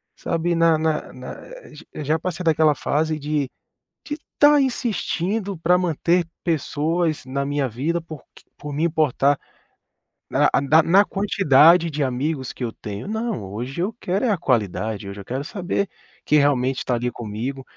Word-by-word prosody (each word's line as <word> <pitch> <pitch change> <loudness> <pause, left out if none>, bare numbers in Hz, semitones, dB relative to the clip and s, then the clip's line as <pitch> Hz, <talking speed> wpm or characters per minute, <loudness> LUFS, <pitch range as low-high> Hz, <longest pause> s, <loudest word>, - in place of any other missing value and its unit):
sabe, 170 +1 -1
na 165 -1 +4
na 155 -1 -1
na 125 0 -8 0.6
eh, 150 - -4
já 155 +3 +1
passei 180 +1 -4
daquela 155 -2 +3
fase 155 +3 0
de 145 -2 -1 0.6
de 295 0 -4 0.2
tá 290 0 +6
insistindo 210 -6 -1
pra 180 +2 +3
manter 175 0 +1 0.2
pessoas 160 0 0
na 140 +1 -2
minha 145 -1 0
vida 145 +9 -2
por 155 -3 -9
q - - -18
por 150 - -7
me 155 +3 0
importar 145 -4 +2 0.9
na - - +3
a - - +4
da 150 +3 +5
na 195 +5 +5
quantidade 170 -5 +4
de 150 0 -1
amigos 130 +1 -2
que - - -7
eu 115 - -2
tenho. 105 +1 -7
Não, 220 - -2
hoje 120 - -5
eu 200 +5 -1
quero 190 +6 0
é 235 - +2
a 200 - +1
qualidade, 110 - -1
hoje 100 +1 -8
eu - - -13
quero 130 +5 -3
saber 195 +4 -2 0.4
quem 150 - +4
realmente 135 -2 +1
tá 125 - +1
ali 120 +1 -2
comigo. 120 +5 -5
155 Hz, 170 wpm, -22 LUFS, 135-175 Hz, 0.9 s, tá